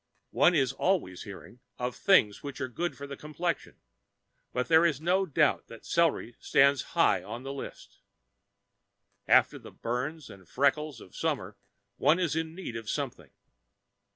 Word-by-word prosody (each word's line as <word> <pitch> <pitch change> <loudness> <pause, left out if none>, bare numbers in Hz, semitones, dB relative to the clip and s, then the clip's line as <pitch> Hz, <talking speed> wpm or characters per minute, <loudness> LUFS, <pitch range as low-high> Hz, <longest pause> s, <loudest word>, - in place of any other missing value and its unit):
One 175 - +4
is 135 -5 +2
always 165 - -1
hearing 100 +4 -11 0.2
of 125 0 -3
things 110 - +4
which 140 -2 -7
are 130 - -2
good 145 +3 -3
for 140 - -7
the 140 0 -7
complexion, 155 +3 -4 0.8
but 125 0 -1
there 160 0 +6
is 160 -6 +2
no 185 +4 +1
doubt 150 -1 +2
that 115 - -12
celery 165 -8 +1
stands 140 -1 +4 0.2
high - - +4
on 120 +2 -7
the 135 +1 -5
list. 140 - -9 1.3
After - - +4
the - - -12
burns 130 +6 -4
and 95 -3 -15
freckles 140 -1 0
of 90 - -15
summer - - -2 0.4
one 160 - +4
is 175 -4 0
in 160 0 -3
need 180 -11 -6
of 115 -1 -6
something. - - -4
140 Hz, 155 wpm, -29 LUFS, 125-165 Hz, 1.3 s, there